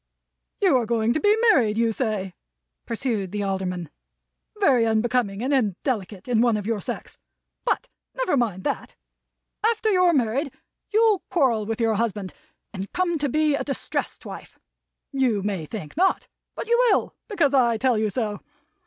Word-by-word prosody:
"You 370 -10 +5
are 235 -3 -1
going 230 0 +1
to 310 - 0
be 415 +4 +4
married, 220 - +2
you 230 0 +2
say," 210 -6 -2 0.5
pursued 225 -5 -2
the 205 -1 -2
Alderman. 185 -4 -3 0.7
"Very 265 - +4
unbecoming 225 -1 +1
and 275 +3 0
indelicate 210 - -1
in 235 -3 +2
one 235 -3 +3
of 205 - -5
your 220 -2 -1
sex! - - -6 0.5
But - - 0 0.3
never - - +1
mind 215 -8 0
that. - - -3 0.7
After 445 -1 +2
you're 365 -2 +4
married, 265 +3 0 0.4
you'll 435 -2 +4
quarrel 235 - +2
with 225 0 -3
your 225 -1 +2
husband, 210 -3 -2 0.4
and 195 -1 -6
come 345 -3 0
to 290 -1 0
be 305 +2 +2
a 280 - 0
distressed 275 - -3
wife. - - -9 0.5
You 250 -8 +1
may 195 -6 -2
think 190 -7 -7
not; 375 +4 +2 0.3
but - - -5
you 475 +1 +4
will, 400 - +1
because 335 - +1
I 240 -4 +4
tell 250 +1 +2
you 215 -1 +1
so. 210 -2 -2
235 Hz, 160 wpm, -24 LUFS, 210-285 Hz, 0.7 s, You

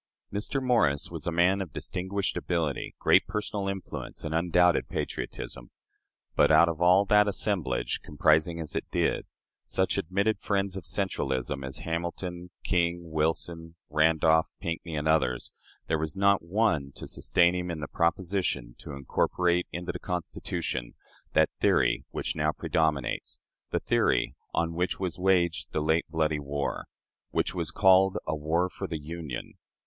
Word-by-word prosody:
Mr. 105 +7 -1
Morris 115 - +2
was - - -6
a - - +1
man 90 +4 +3
of 90 -6 -5
distinguished 95 +2 -2
ability, 80 -6 -2
great - - +4
personal 105 -1 -3
influence, 95 -1 -6
and 80 - -3
undoubted 90 +1 +3
patriotism, - - -5 0.7
but, - - +5
out 85 - +7
of 85 -1 -3
all 90 +3 +6
that 105 +1 +5
assemblage 80 - -1
comprising, 80 +3 +2
as 80 -2 -4
it - - -3
did, - - 0 0.4
such - - 0
admitted 100 +4 0
friends 100 -2 -1
of 95 -5 -6
centralism 70 -8 -1
as 65 0 -5
Hamilton, 85 +2 -4
King, 85 -2 0
Wilson, 80 +1 -1 0.2
Randolph, 80 +1 +4
Pinckney, 85 -1 -4
and 75 +1 -1
others 70 -6 +1 0.3
there 80 - 0
was 80 +2 -2
not 100 0 +4
one 85 -6 +1
to - - -7
sustain 85 0 +3
him 90 0 -3
in 85 -2 -3
the 75 - -4
proposition 85 -7 -1
to - - -8
incorporate 85 +6 +1
into 85 +1 -4
the - - -7
Constitution 75 -7 -4 0.4
that - - +4
theory - - +2
which - - -3
now 75 -1 +1
predominates, 80 -4 -1 0.3
the - - 0
theory - - +1 0.2
on 85 0 0
which 90 +1 -1
was 90 -2 -2
waged 90 -3 +1
the - - +1
late 80 +2 +1
bloody 80 -1 0
war, 70 0 -3 0.4
which - - 0
was 85 -3 -2
called 95 +1 +5
a 75 - -1
"war 80 +4 +1
for 95 +1 -6
the 80 - -3
Union." 75 -4 -7
85 Hz, 150 wpm, -28 LUFS, 75-95 Hz, 0.7 s, out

